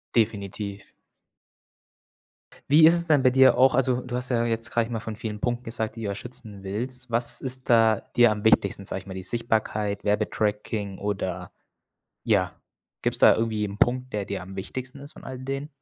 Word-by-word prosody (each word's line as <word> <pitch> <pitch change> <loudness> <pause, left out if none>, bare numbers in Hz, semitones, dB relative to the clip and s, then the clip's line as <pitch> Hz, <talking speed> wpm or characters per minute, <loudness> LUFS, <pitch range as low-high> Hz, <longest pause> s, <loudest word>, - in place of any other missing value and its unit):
Definitiv. 100 -2 -1 1.9
Wie 155 +2 +7
ist 165 - +8
es 170 0 +3
denn 150 -4 +3
bei 130 - +6
dir 130 +1 +5
auch 130 +1 +5
also, 130 -1 +2
du 125 -1 -6
hast 125 +1 -3
ja 120 -1 +1
jetzt, 115 0 -1
sage 115 -1 +2
ich - - -10
mal, 115 - -3
von 110 -1 -6
vielen 105 -1 -5
Punkten 120 0 -1
gesagt, 115 -1 -3
die 115 - -7
du 105 - -2
da 100 - -3
schützen 105 -3 -8
willst. 120 +5 -4
Was 115 +1 0
ist 130 -1 -2
da 115 -2 +5 0.2
dir 120 -2 +6
am 105 0 -4
wichtigsten, 100 -2 +3
sage 95 - -3
ich 95 - -20
mal, 95 - -8
die 95 0 -6
Sichtbarkeit, 110 -3 -1
Werbetracking 105 -1 -1
oder, 100 -3 -4 0.7
ja, - - +1 0.4
gibt's - - 0
da - - +7
irgendwie 110 -2 -1
'n 100 - -7
Punkt, 125 +3 +1
der 105 -1 -1
dir 100 -1 -4
am 95 +1 -10
wichtigsten 130 +7 -6
ist 145 +2 -11
von - - -14
all 130 -1 -7
den? 135 +3 -5
115 Hz, 195 wpm, -25 LUFS, 105-125 Hz, 1.9 s, ist